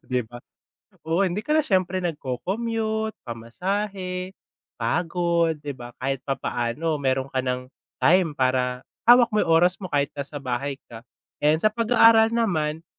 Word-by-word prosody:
Di 125 -1 +1
ba, 120 +2 -11 0.7
oo, 170 +5 +2
hindi 185 +2 -1
ka 300 +8 -1
na 310 - +4
siyempre 185 -5 0
nag-co-commute, 220 - -2
pamasahe, 185 - -4 0.4
pagod, 170 +6 0
di 145 - -3
ba 120 -2 -11
kahit 135 +1 -2
papaano 135 +4 -2
meron 135 0 -1
ka 130 - -1
ng 125 0 -3 0.3
time 170 -3 +4
para 130 -1 0 0.2
hawak 240 0 +7
mo 210 - +2
'yung - - +1
oras 180 +2 +3
mo 190 - -6
kahit 145 -3 0
nasa 140 +1 -7
bahay 130 +2 -2 0.2
ka. 115 - -8 0.4
Ayan, 155 +4 +2
sa 215 - +4
pag-aaral 230 0 +5
naman, 160 -8 0
165 Hz, 150 wpm, -24 LUFS, 130-195 Hz, 0.7 s, hawak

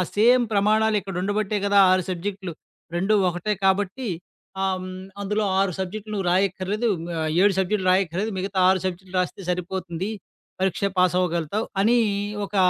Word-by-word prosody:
Same 240 +4 +5
ప్రమాణాలు 215 +2 +3
ఇక్కడ 195 -1 -7
ఉండబట్టాయి 205 0 -1
కదా! 200 0 +3
6 185 0 +3
సబ్జెక్టులు. 190 0 -4 0.4
2 195 +5 +1 0.2
ఒకటే 175 +4 -2
కాబట్టి. 200 +6 +1 0.5
ఆ! - - +1 0.2
హ్మ్ 185 0 -7 0.3
అందులో 210 +2 -1 0.2
6 195 -1 +2
సబ్జెక్టులు 210 +3 -5
నువ్వు 195 -3 -2
రాయక్కర్లేదు. 195 +4 0 0.2
మ - - -7 0.2
ఆహ్, 155 - -1
7 200 0 +5
సబ్జెక్టులు 190 0 +1
రాయక్కర్లేదు. 190 +3 0
మిగతా 190 +1 -4
6 190 0 +3
సబ్జెక్టులు 185 0 -5
రాస్తే 180 +2 -3
సరిపోతుంది. 180 +1 -3 0.5
పరీక్ష 190 0 0
పాస్ 180 -1 +4
అవ్వగలుగుతావు. 180 +3 -1 0.2
అని 230 +4 +4 0.5
ఒక 205 - -9
190 Hz, 150 wpm, -24 LUFS, 185-210 Hz, 0.5 s, Same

